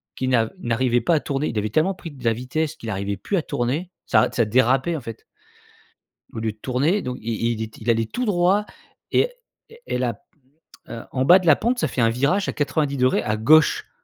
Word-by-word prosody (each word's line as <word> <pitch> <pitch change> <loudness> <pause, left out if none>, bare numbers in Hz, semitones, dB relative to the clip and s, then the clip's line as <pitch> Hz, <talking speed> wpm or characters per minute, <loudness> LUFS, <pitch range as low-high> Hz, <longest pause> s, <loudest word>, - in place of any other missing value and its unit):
qui 130 - -3
n'a 115 -3 +2
n'arrivait 120 -1 +1
pas 165 +8 +2
à - - +2
tourner, 140 +1 -2
il 115 - -4
avait 105 0 -1
tellement 175 - +1
pris 170 -3 -9
de 135 -3 -14
la 115 -1 +2
vitesse 135 +6 -3
qu'il 115 - -8
arrivait 100 0 -3
plus 200 - -3
à - - +1
tourner, 145 +7 -2 0.2
ça 110 -2 +3
d 120 - -13
ça 120 -2 +3
dérapait, 130 +8 +2
en 155 - -5
fait 115 -2 -9 1.1
au 110 - -5
lieu 110 -1 -1
de 105 - -19
tourner 135 - 0
donc 125 -5 -5
il 115 +1 -1
il 110 - -6
était 110 0 -10
il 115 - -3
allait 115 -1 +2
tout 250 - -3
droit 195 +1 +2 0.5
et - - +2 0.4
et 460 +1 -16
et - - -1
la 125 -2 -1
p 105 - -22 0.7
heu, 115 - -7
en 130 - 0
bas 175 +6 +8
de 185 - -7
la 155 - +7
pente, 245 +2 0
ça - - +1
fait 125 - -2
un 115 - +4
virage 145 - +1
à - - -3
90° 140 -3 +1
à 110 0 -1
gauche. 155 +8 +4
130 Hz, 235 wpm, -22 LUFS, 115-160 Hz, 1.1 s, bas